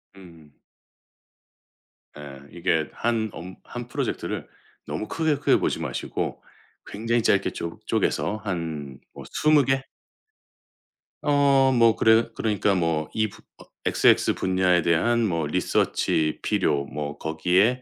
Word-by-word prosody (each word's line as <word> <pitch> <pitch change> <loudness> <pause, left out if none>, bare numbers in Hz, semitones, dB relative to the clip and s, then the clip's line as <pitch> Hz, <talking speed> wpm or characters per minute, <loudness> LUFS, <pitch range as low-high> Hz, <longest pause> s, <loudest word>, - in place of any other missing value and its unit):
음음. 85 -7 -16 1.6
예 70 -2 -10
이게 80 -2 0
1 115 -2 -1
업 90 +3 -9
1 120 -1 -7
프로젝트를 120 - -3 0.4
너무 110 - -4
크게, 160 -2 0
크게 140 - +3
보지 - - -1
마시고 - - -4 0.4
굉장히 115 +3 -1
짧게 100 -3 +2
쪼 85 0 -6
쪼개서 105 - 0
한 80 -8 -4
뭐 - - -10
20 155 -2 +4
개? 135 +1 +1 1.4
어 140 -2 +4
뭐 115 -3 +4
그래 110 +1 +4
그러니까 105 -2 +1
뭐 80 -3 0
이 110 0 +1
부 - - -16 0.2
어 - - -15 0.2
XX - - +3
분야에 90 -1 +2
대한 115 +9 +2
뭐 85 -5 -1
리서치 80 -1 0
필요 70 -1 +1
뭐 75 0 -5
거기에 90 +10 +1
95 Hz, 210 characters per minute, -24 LUFS, 80-120 Hz, 1.6 s, 20